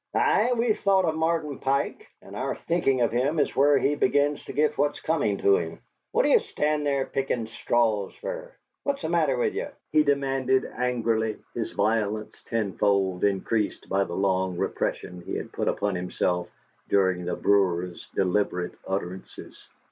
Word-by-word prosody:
"Ay, 435 - +3
we've 230 -2 +1
thought 195 -2 +3
o' 160 - +2
Martin 160 -2 -1
Pike, 140 - -1 0.2
and - - -11
our - - -2
thinkin' 135 -7 +1
of 120 - +2
him 130 +7 +1
is 145 - +1
where 140 +1 +5
he 140 +2 +2
begins 145 +1 +1
to - - -6
git 150 +1 +1
what's 145 0 0
comin' 145 -11 0
to 100 0 +4
him! 80 -1 -4 0.3
What - - +3
d'ye - - +5
stand 150 0 -1
there 140 -2 +1
pickin' 135 -4 -2
straws 110 -2 0
fer? - - -6 0.3
What's 280 -8 -2
the 160 - -1
matter 155 -6 +2
with 120 - +1
ye?" - - -3 0.2
he 155 - +5
demanded, 135 -2 +1
angrily, 115 -3 -1 0.2
his 115 - -3
violence 105 0 -1
tenfold 100 -4 0
increased 100 +2 0
by 100 +1 +2
the 85 - -5
long 95 -2 0
repression 90 0 -2
he - - -5
had - - -5
put - - -2
upon 100 -1 0
himself 90 0 -1 0.4
during 95 -2 +2
the 90 - -2
brewer's 90 -3 +1
deliberate 90 -2 0
utterances. 95 -1 -6
120 Hz, 165 wpm, -26 LUFS, 100-145 Hz, 0.4 s, where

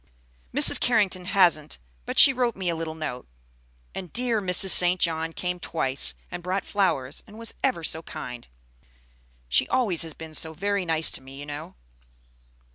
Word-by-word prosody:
"Mrs. - - +8
Carrington 200 -6 0
hasn't, 175 -6 +1 0.3
but - - -6
she 275 - +7
wrote 245 -3 -2
me 185 -2 -4
a 170 - -3
little 160 -1 -7
note. 140 -6 -8 0.7
And 185 -3 -9
dear 235 -3 -1
Mrs. 185 0 +5
St. 180 +1 +6
John 165 -1 -2
came 180 +1 -5
twice, 135 -6 0 0.2
and - - -8
brought 185 +2 -4
flowers, 160 -10 -3
and 215 - -15
was 230 0 -2
ever 255 -11 -2
so 160 0 -3
kind. 125 -6 -10 1.0
She - - 0
always 220 -10 +1
has 160 -2 -1
been 160 -1 -12
so 160 +1 +1
very 200 +2 -3
nice 160 -1 +2
to - - -2
me, 135 +1 -14
you 145 - -9
know." 145 - -10
175 Hz, 170 wpm, -23 LUFS, 155-200 Hz, 1.0 s, Mrs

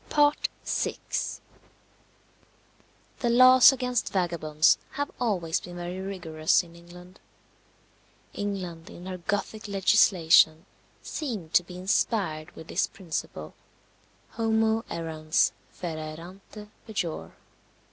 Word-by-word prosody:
VI. - - -1 2.2
The 240 - 0
laws 255 +2 +8
against 250 -3 -1
vagabonds 160 -4 +2
have 285 0 -3
always 185 -9 0
been 175 - -10
very 175 +1 -5
rigorous 175 -5 0
in 170 -1 -16
England. 180 +2 -14 1.1
England, 185 -5 -5
in 175 - -11
her 185 -1 -6
Gothic 205 +4 -3
legislation, 180 -5 +4 0.4
seemed 215 - -5
to - - +6
be 180 +1 -10
inspired 180 -4 0
with 160 - -11
this 190 - 0
principle, 155 - -6 0.8
Homo 225 0 +1
errans 160 -2 0 0.2
fera 155 -3 -6
errante 195 +4 -12 0.2
pejor. 190 -7 -4
180 Hz, 95 wpm, -27 LUFS, 165-210 Hz, 2.2 s, laws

